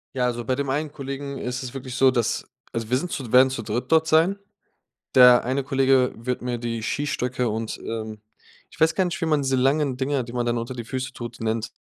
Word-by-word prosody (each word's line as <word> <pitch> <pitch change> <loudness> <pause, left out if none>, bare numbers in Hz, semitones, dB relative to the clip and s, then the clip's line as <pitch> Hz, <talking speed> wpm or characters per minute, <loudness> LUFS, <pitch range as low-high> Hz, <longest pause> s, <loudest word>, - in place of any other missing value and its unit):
Ja, 125 - +1
also 120 -1 -2
bei 130 - 0
dem 140 0 -2
einen 150 +2 -1
Kollegen 140 -1 -6
ist 125 +1 -4
es 125 - -7
wirklich 130 -2 -6
so, 135 0 +5
dass 120 -2 -1 0.3
also 115 -2 -3
wir 125 - +3
sind 175 +6 -4
zu 125 -5 -5
werden 130 +1 +7
zu 130 - -4
dritt 120 +5 -4
dort 160 0 +4
sein. 165 +6 +3 0.8
Der 125 -1 +8
eine 130 +2 -1
Kollege 135 -1 +3
wird 125 +3 -3
mir 125 -1 -2
die 115 -1 -4
Skistöcke 125 -2 -1
und, 110 0 -3
ähm 110 -1 -6 0.5
ich - - -17
weiß 160 0 +3
gar 190 -2 +2
nicht, 170 - -3
wie - - +3
man 155 -2 +2
diese 135 -1 0
langen 135 0 +2
Dinger, 135 0 0
die 120 +1 -10
man 120 - 0
dann 120 0 0
unter 115 +2 -5
die 120 -2 -6
Füße 130 +2 -4
tut, 120 -1 -8
nennt. 110 0 -1
130 Hz, 235 wpm, -24 LUFS, 120-140 Hz, 0.8 s, Der